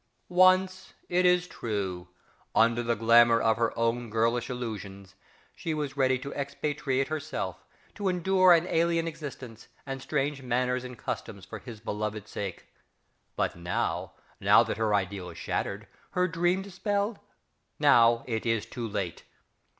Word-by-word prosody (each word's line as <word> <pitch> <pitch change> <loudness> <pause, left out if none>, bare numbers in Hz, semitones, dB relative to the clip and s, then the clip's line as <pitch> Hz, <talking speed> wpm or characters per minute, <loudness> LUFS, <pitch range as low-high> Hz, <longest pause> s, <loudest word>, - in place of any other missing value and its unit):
_) - - -46 0.3
Once, 185 +1 +3 0.2
it 180 +1 +3
is 180 0 +3
true, 95 - -4 0.5
under 115 +1 +4
the 120 0 0
glamour 115 +1 +6
of 110 -1 +2
her 115 -1 +1
own 115 +1 0
girlish 115 +3 +1
illusions, 100 -6 -6 0.4
she 160 -2 -3
was 145 -3 -3
ready 130 -2 +3
to 140 +2 -7
expatriate 140 -1 -2
herself, 155 0 -4 0.3
to 200 -3 -1
endure 185 +1 +4
an 170 0 +6
alien 165 -1 +1
existence, 130 -8 -8 0.2
and 135 -1 -5
strange 140 0 -1
manners 125 0 0
and 125 -1 -8
customs 100 -4 -5
for - - -8
his 115 -4 -10
beloved 105 -1 -4
sake; 100 -4 -6 0.7
but - - -1
now, 85 +1 -2 0.3
now - - +6
that - - -3
her 110 -2 +2
ideal 95 -2 -2
is 85 - -11
shattered, 100 +2 -3 0.3
her 180 -1 +2
dream 175 +2 +1
dispelled, 200 +2 -2 0.6
now, 115 0 +5
it 115 -3 -2
is 115 -2 0
too 120 -2 -5
late! 100 -5 -4
125 Hz, 150 wpm, -28 LUFS, 110-165 Hz, 0.7 s, glamour